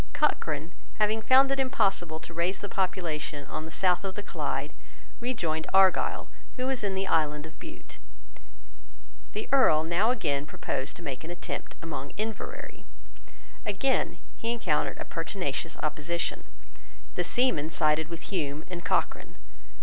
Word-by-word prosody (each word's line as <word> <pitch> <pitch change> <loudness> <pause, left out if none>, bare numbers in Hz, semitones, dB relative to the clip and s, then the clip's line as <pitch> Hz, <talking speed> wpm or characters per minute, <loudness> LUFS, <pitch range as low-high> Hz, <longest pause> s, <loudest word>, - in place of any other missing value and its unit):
Cochrane, 165 - 0 0.2
having 215 +1 +2
found 265 +4 +6
it 275 - +1
impossible 195 - +1
to 170 - -9
raise 175 +3 0
the 205 - -4
population 170 -7 -1
on 155 - -4
the - - -6
south 180 +3 +2
of 195 -1 -3
the 205 - -4
Clyde, 145 -4 -2 0.5
rejoined 170 -11 -1
Argyle, 190 -1 +5 0.3
who 255 - -1
was 260 -3 0
in 195 -2 0
the 190 +1 0
island 150 -3 +2
of 160 - -12
Bute. 325 0 -10 1.3
The - - -3
Earl 255 - +6
now 175 +7 +3
again 150 - +1
proposed 130 -2 -3
to 175 - -9
make 135 -3 -4
an 160 - -7
attempt 175 - -5
upon 145 -4 -5
Inverary. 220 +1 -4 0.8
Again 215 +6 +1 0.2
he 230 - -1
encountered 185 -10 +1
a - - -3
pertinacious 165 -4 -3
opposition. 155 +3 -1 0.7
The - - 0
seamen 240 - +2
sided 155 0 +2
with 170 +3 -5
Hume 150 -4 -1
and 175 -1 -5
Cochrane. - - 0
175 Hz, 145 wpm, -29 LUFS, 155-210 Hz, 1.3 s, found